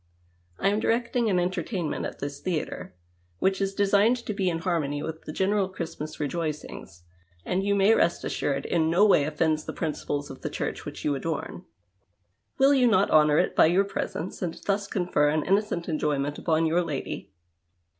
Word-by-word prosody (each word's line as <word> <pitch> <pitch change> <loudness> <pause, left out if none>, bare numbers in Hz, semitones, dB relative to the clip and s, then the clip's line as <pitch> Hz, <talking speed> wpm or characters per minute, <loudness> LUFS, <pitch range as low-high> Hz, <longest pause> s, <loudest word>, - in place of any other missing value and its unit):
I 195 - +2
am 205 +1 +1
directing 235 0 +1
an 185 - +2
entertainnu 180 -1 -1
ut - - -3
at - - -6
this 140 0 -5
theatre, 160 - -4 0.4
which 190 - +1
is 195 0 -1
designed 205 +4 +3
to 215 - -2
be 195 -2 0
in 165 - -1
harmony 155 -4 -1
with 160 0 -6
the - - -5
general 190 +3 +1
Christmas 160 -4 -6
rejoicings, 150 - -4 0.4
and, 185 +2 0
you 200 0 +1
may 200 +2 +5
rest 170 -5 +2
assured, 140 -1 -2
in 160 -2 +1
no 180 +5 +5
way 170 -9 +5
offends 155 0 0
the - - -5
jirinciples 145 -3 -3
of 135 - -11
the - - -3
Ciuireh - - -4
which - - -7
you 150 - +2
adorn. 160 +4 -4 0.9
Will 270 +1 +5
you 255 -3 +4
not 205 -3 +3
honour 150 -1 +5
it - - +1
by - - +6
your 180 +4 +3
presence 190 -3 -4
and 170 -3 -2
thus 200 0 0
confer 175 -7 +1
an 155 0 0
innocent 195 -3 0
enjoyment 145 -3 -1
upon 165 -1 +1
your 165 +2 +2
lady 155 -6 -5
170 Hz, 185 wpm, -26 LUFS, 150-195 Hz, 0.9 s, by